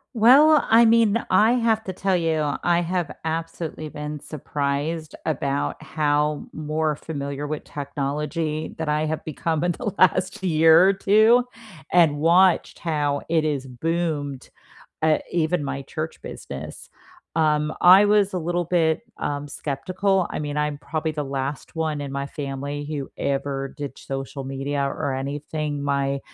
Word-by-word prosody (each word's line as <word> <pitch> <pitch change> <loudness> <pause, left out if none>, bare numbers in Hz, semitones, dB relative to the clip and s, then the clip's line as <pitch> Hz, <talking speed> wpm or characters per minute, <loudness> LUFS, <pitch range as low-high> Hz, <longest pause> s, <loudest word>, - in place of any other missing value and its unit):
Well, 280 +7 +6
I 230 +1 +6
mean, 230 -1 +4
I 215 +5 +5
have 230 -3 +1
to 190 - -5
tell 190 +1 0
you, 155 -3 0
I 175 0 +3
have 175 -2 -2
absolutely 160 -1 -4
been 150 0 -6
surprised 150 +2 -3
about 140 -2 -2
how 150 -1 0
more 155 0 -1
familiar 140 -2 -5
with 150 0 -4
technology 150 +2 -3
that 160 - -2
I 150 +1 +1
have 155 0 -3
become 160 +1 -2
in 175 -1 +1
the 225 -5 -4
last 185 +2 +3
year 165 +1 +6
or 195 - +3
2 220 +5 +4 0.5
and 165 -5 +4
watched 175 +4 +3
how 145 -4 -1
it 160 -2 +2
is 140 -3 -2
boomed, 145 0 -3 0.5
uh, 155 -1 +4
even 170 -1 0
my 140 0 -3
church 155 +4 -6
business. - - -8 0.5
Um, 150 -1 +2
I 185 +3 +8
was 205 -1 +3
a 185 - 0
little 175 +1 -1
bit, 165 +1 +1
um, 145 0 -3
skeptical, 185 +7 -1
I - - -3
mean 150 0 -4
I'm 150 -1 -1
probably 155 +1 -3
the 150 -1 -2
last 135 +3 -4
one 155 -2 -1
in 140 - -5
my 140 0 -3
family 140 0 -5
who 145 -2 -5
ever 135 0 -2
did 140 -2 -6
social 135 0 -6
media 135 +1 -2
or 140 0 -2
anything, 145 +2 -3
my 140 -1 0
155 Hz, 150 wpm, -23 LUFS, 145-175 Hz, 0.5 s, I